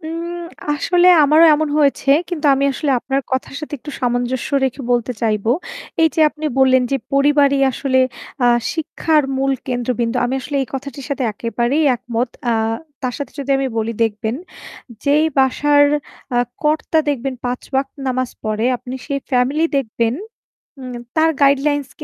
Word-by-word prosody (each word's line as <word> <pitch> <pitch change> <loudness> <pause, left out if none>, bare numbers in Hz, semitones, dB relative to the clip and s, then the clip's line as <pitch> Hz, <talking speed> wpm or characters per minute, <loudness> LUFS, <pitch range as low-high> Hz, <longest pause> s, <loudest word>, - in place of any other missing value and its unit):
উম 335 +2 -5 0.3
আসলে 350 +4 +2 0.2
আমারও 305 +3 +6
এমন 310 +1 0
হয়েছে 280 -1 +2 0.2
কিন্তু 325 -4 -2
আমি 275 +1 0
আসলে 285 +2 -2
আপনার 270 +3 -1
কথার 260 +1 -2
সাথে 305 -1 -6
একটু 295 +4 -9
সামঞ্জস্য 245 0 -1 0.2
রেখে 265 +1 -2
বলতে 240 0 0
চাইবো। 220 -1 +1 0.5
এই 320 - +6
যে - - 0
আপনি 300 +1 -9
বললেন 260 -1 +5
যে 275 - +2 0.2
পরিবারই 280 0 +3
আসলে 260 0 0 0.5
আ - - +5 0.3
শিক্ষার 320 -1 +1
মূল 270 +1 +1
কেন্দ্রবিন্দু। 245 -1 -1
আমি 245 +2 -1
আসলে 285 +2 -4
এই 260 - -6
কথাটির 275 +1 -6
সাথে 280 -1 -2
একেবারেই 240 +7 0
একমত। 235 +1 -2 0.2
আ - - +3 0.5
তার 250 -2 -2
সাথে 285 - -6
যদি 280 0 -4
আমি 270 - 0
বলি 225 +1 -1
দেখবেন 220 0 -1 0.7
যেই 295 +2 +3
বাসার 290 +2 +4 0.5
আ - - +3 0.2
কর্তা 310 +1 +1
দেখবেন 270 -2 -1
৫ 245 0 -2
ওয়াক্ত 270 0 +1 0.2
নামাজ 255 -1 -1
পড়ে 215 +1 -1
আপনি 250 +1 -8
সেই 280 -2 -1
ফ্যামিলি 265 +5 +2
দেখবেন। 230 -2 0 0.7
উ - - -8 0.3
তার 320 0 +4
গাইডলাইনস 280 0 +2
270 Hz, 155 wpm, -19 LUFS, 245-295 Hz, 0.7 s, আমারও